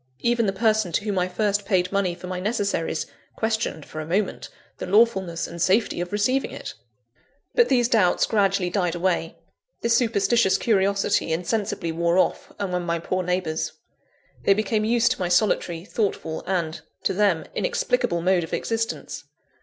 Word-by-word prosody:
Even 235 -2 +2
the - - +2
person 215 -2 +1
to - - +1
whom 205 -3 -1
I 180 - +1
first 205 +2 0
paid 185 -3 +1
money 195 -3 0
for 180 - -10
my 180 0 -4
necessaries, 200 -6 -1 0.3
questioned, 220 -8 -2
for 155 - -6
a - - -6
moment, 190 +4 -1 0.3
the - - -4
lawfulness 190 -5 +2
and 170 0 -7
safety 190 0 +2
of 175 - -4
receiving 235 +6 +1
it! - - -7 0.8
But 475 -1 +4
these 245 -3 +3
doubts 210 -7 +3
gradually 195 -4 +1
died 180 -3 0
away; 175 -2 -1 0.5
this 235 0 +2
superstitious 230 -2 +3
curiosity 200 -4 +1
insensibly 180 +1 -1
wore 170 +2 +1
off, 185 - +1
among 180 -3 -2
my 170 -1 -1
poor 185 +3 -2
neighbours. 180 -3 -2 0.7
They 195 - +4
became 215 +1 0
used 235 +1 +3
to 255 - -2
my 180 - -1
solitary, 175 -3 +1
thoughtful, 195 -7 -2
and 170 -4 -1 0.2
(to - - +1
them) 190 -5 +2
inexplicable - - 0
mode 185 -1 +3
of 160 - -8
existence. 225 -11 -3
195 Hz, 160 wpm, -24 LUFS, 175-220 Hz, 0.8 s, But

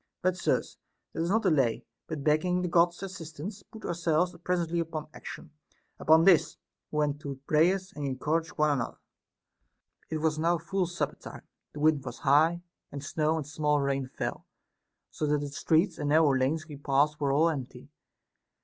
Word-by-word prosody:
But, 185 0 +2
sirs, 185 - -1 0.3
let 165 - -1
us - - -2
not 225 +4 +2
delay, 135 - +2 0.2
but 155 -3 -5
begging 180 +5 +2
the - - 0
God's 175 +1 +2
assistance, 185 +1 -7
put 220 +3 -12
ourselves 170 0 0
presently 175 -2 0
upon 160 -2 -3
action. - - -9 0.5
Upon 160 +1 +5
this, 175 -3 +4 0.3
we 150 - -5
went 145 -1 +1
to 140 -2 -6
prayers, 185 +5 +2
and 145 -1 -3
encouraged 160 +6 -2
one 150 -1 +3
an 140 -4 +1
other. - - -5 1.1
30. 160 - -3
It - - +1
was 155 -1 +1
now 170 +2 +2
full 180 +3 -1
supper 175 - -3
time, - - -10 0.3
the 145 - -7
wind 150 -3 +3
was 130 - -7
high, 160 +5 +3 0.3
and 140 0 -6
snow 155 +2 0
and 155 - -3
small 150 0 0
rain 140 -1 -1
fell, - - -5 0.6
so 150 - -2
that 150 0 +2
the 145 - -4
streets 160 +5 +1
and 145 - -1
nar 155 +2 +5
row 145 - +4
lanes 140 +4 0
we 145 -3 -9
passed 145 +2 +1
were 140 -1 +2
all 155 +4 +4
empty. 135 -6 -6
155 Hz, 185 wpm, -29 LUFS, 145-170 Hz, 1.1 s, Upon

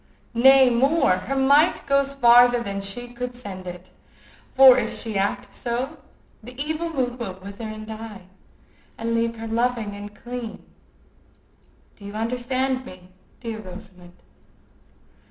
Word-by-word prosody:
Nay, 260 +2 +6
more; 275 - +3
her 255 +9 -4
might 280 +5 +3
goes 275 0 +1
farther 245 -1 +6
than 200 -2 -4
she 200 +5 -4
could 245 0 -6
send 195 -6 -8
it, 180 +1 -9 0.6
for 265 -1 +9
if 235 -3 -1
she 220 -2 -2
act 195 +1 -2
so, 255 +6 -4 0.4
the 245 +3 -12
evil 315 +3 -2
mood 255 -5 -2
will 195 -6 -5
wither 200 +4 -8
and 215 0 -7
die, 220 -3 -8 0.7
and 230 0 -2
leave 230 0 0
her 225 - -6
loving 230 -2 -1
and 205 +1 -9
clean.—Do 235 -3 -13
you 200 0 -8
understand 255 +3 -1
me, 185 -5 -13 0.3
dear 225 -3 -5
Rosamond?" 180 -2 -12
235 Hz, 135 wpm, -23 LUFS, 205-255 Hz, 0.7 s, for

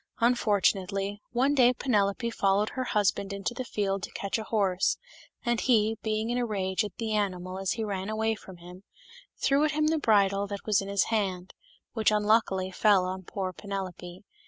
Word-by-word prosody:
Unfortunately, 205 -3 +1
one 260 +4 +2
day 250 -3 +5
Penelope 235 -2 0
followed 200 0 +1
her 260 -2 -3
husband 200 -3 0
into 200 +4 -3
the 255 +1 -4
field 200 -4 -2
to - - -5
catch 200 +3 -2
a - - -4
horse, 195 -5 +1 0.5
and 240 -1 +1
he, 225 -3 +3
being 220 +1 -1
in 245 - 0
a 245 - 0
rage 190 -1 -1
at 205 - -6
the 225 -2 -2
animal 185 -3 -2
as 195 -1 0
he 225 - -3
ran 195 -2 -3
away 220 +1 0
from 190 -4 -11
him, 180 +2 -12 0.6
threw 280 +2 +3
at 305 0 +1
him 305 0 +1
the 320 0 +1
bridle 200 -5 +3
that 200 0 -6
was 210 -3 +2
in 195 - -6
his 200 0 +2
hand, 190 -4 -1 0.4
which 220 -3 +2
unluckily 210 -3 +2
fell 195 -1 +3
on 185 +1 -4
poor 185 0 -4
Penelope. 185 -2 -6
205 Hz, 185 wpm, -28 LUFS, 195-225 Hz, 0.6 s, day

